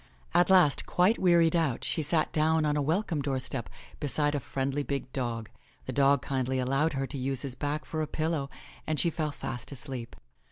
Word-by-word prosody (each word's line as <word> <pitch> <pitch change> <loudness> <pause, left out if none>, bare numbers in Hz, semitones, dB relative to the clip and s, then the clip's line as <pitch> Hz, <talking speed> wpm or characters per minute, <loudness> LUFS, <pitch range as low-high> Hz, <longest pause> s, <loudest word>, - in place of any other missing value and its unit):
At 175 - +4
last, 180 -7 +5
quite 185 +6 +3
wearied 170 -2 +4
out, 160 -7 +1
she 160 - 0
sat 155 +1 +1
down 160 0 +2
on 150 -1 +1
a 150 - +1
welcome 160 +1 0
doorstep 135 -3 -3 0.3
beside 145 0 +1
a 145 - 0
friendly 135 +2 -2
big 140 -2 -4
dog. 115 -4 -2 0.4
The - - -4
dog 140 -1 +4
kindly 130 -1 -1
allowed 135 +5 +1
her 135 0 -1
to 140 - -6
use 135 +1 -1
his 135 -3 -4
back 145 +4 -3
for 155 -1 -3
a 155 - -1
pillow 155 -3 -1 0.4
and 155 -1 0
she 170 - +3
fell 155 -1 -2
fast 125 -3 -6
asleep. 130 -3 -5
145 Hz, 195 wpm, -29 LUFS, 135-160 Hz, 0.4 s, last